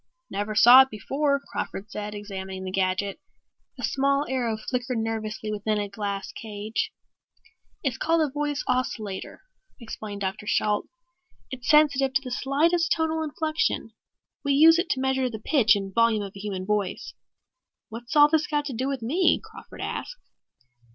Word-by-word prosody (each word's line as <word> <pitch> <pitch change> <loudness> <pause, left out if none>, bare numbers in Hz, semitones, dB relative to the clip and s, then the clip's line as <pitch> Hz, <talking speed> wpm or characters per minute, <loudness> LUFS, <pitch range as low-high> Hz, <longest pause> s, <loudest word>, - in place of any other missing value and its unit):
"Never 205 +1 -3
saw 245 +4 +9
it 265 - +2
before," 280 +6 0
Crawford 205 -6 -6
said, 210 0 -5
examining 190 -2 -6
the 185 - -5
gadget. 190 +1 -1 0.6
A - - -6
small 275 +1 +1
arrow 240 -4 -1
flickered 250 +2 -3
nervously 220 -1 -3
within 210 +1 -1
a 205 -1 -2
glass 200 -1 -4
cage. 215 0 -4 0.9
"It's 265 -3 -1
called 325 -1 +2
a 265 - -11
Voice 295 -1 -2
Oscillator," 220 -6 -3 0.4
explained 215 -3 -7
Dr. 195 +2 -3
Shalt. 210 0 +1 0.6
"It's 255 -1 -6
sensitive 285 -3 +4
to 270 - +3
the 255 - -7
slightest 315 +7 +1
tonal 320 0 +1
inflection. 315 +5 -1 0.5
We 280 - +1
use 325 +4 +7
it 345 - -1
to 260 - 0
measure 265 -1 +1
the 225 - -6
pitch 225 -1 +3
and 195 -1 -4
volume 230 -1 +3
of 200 -1 -7
a - - -9
human 195 -2 -4
voice." 205 -2 -2 0.8
"What's 235 +5 -7
all 295 0 +8
this 315 +2 +1
got 295 -1 -1
to 280 - -4
do 255 +3 -2
with 270 -4 -3
me?" 325 +9 +3
Crawford - - -12
asked. - - -6
240 Hz, 160 wpm, -26 LUFS, 210-285 Hz, 0.9 s, saw